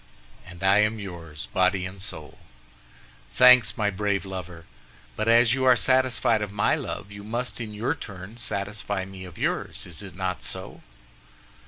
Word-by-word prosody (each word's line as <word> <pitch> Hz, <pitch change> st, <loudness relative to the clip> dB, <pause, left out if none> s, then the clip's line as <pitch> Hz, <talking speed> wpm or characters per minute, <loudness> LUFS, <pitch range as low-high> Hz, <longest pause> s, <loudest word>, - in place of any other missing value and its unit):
"And 90 Hz, +1 st, -11 dB
I 95 Hz, +2 st, +5 dB
am 105 Hz, +1 st, +2 dB
yours, 85 Hz, -6 st, -8 dB
body 95 Hz, -1 st, +2 dB
and 95 Hz, 0 st, -8 dB
soul!" 80 Hz, -6 st, -5 dB, 1.0 s
"Thanks, 125 Hz, -3 st, +7 dB
my 105 Hz, -1 st, +1 dB
brave 100 Hz, 0 st, -1 dB
lover; 90 Hz, -3 st, -7 dB, 0.5 s
but 110 Hz, -, -2 dB
as 115 Hz, 0 st, +6 dB
you 135 Hz, 0 st, 0 dB
are 130 Hz, -1 st, +7 dB
satisfied 130 Hz, -3 st, +2 dB
of 105 Hz, -2 st, -3 dB
my 100 Hz, 0 st, +2 dB
love, 100 Hz, -, -4 dB
you 100 Hz, 0 st, -9 dB
must, 120 Hz, +3 st, -3 dB
in 110 Hz, -2 st, -5 dB
your 110 Hz, +7 st, -1 dB
turn, 100 Hz, -, -9 dB
satisfy 100 Hz, -3 st, -3 dB
me 95 Hz, -1 st, -9 dB
of 90 Hz, -2 st, -12 dB
yours. -, -, -2 dB
Is 85 Hz, 0 st, -8 dB
it 95 Hz, -4 st, -10 dB
not 95 Hz, -1 st, -3 dB
so?" 95 Hz, 0 st, -5 dB
100 Hz, 165 wpm, -26 LUFS, 95-110 Hz, 1.0 s, Thanks